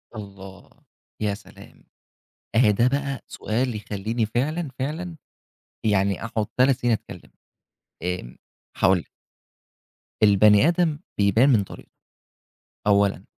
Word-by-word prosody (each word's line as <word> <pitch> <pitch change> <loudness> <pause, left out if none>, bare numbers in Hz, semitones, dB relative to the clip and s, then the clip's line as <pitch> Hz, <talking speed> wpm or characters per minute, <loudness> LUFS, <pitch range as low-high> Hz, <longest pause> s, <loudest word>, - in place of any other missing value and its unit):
الله! 100 -2 -10 0.5
ياسلام! 100 -1 -6 0.7
أهي 110 -2 +5
ده 120 +5 +3
بقى 140 0 -2
سؤال 120 +3 -2
يخليني 110 +2 -2
فعلًا، 150 +9 -1
فعلًا 160 +6 -4 0.7
يعني 100 -2 +1
أقعد 110 -2 -2
3 130 0 +4
سنين 120 -3 +1
أتكلم. - - -6 0.7
آمم، 90 -9 -4 0.4
هاقول 95 -1 +4
لِك. 85 - -10 1.2
البني 105 +4 +6
آدم 170 -3 +1 0.2
بيبان 105 +7 +4
من 110 -7 +4
طريقته، - - -13 0.9
أولًا. 100 -2 +3
110 Hz, 105 wpm, -24 LUFS, 100-130 Hz, 1.2 s, البني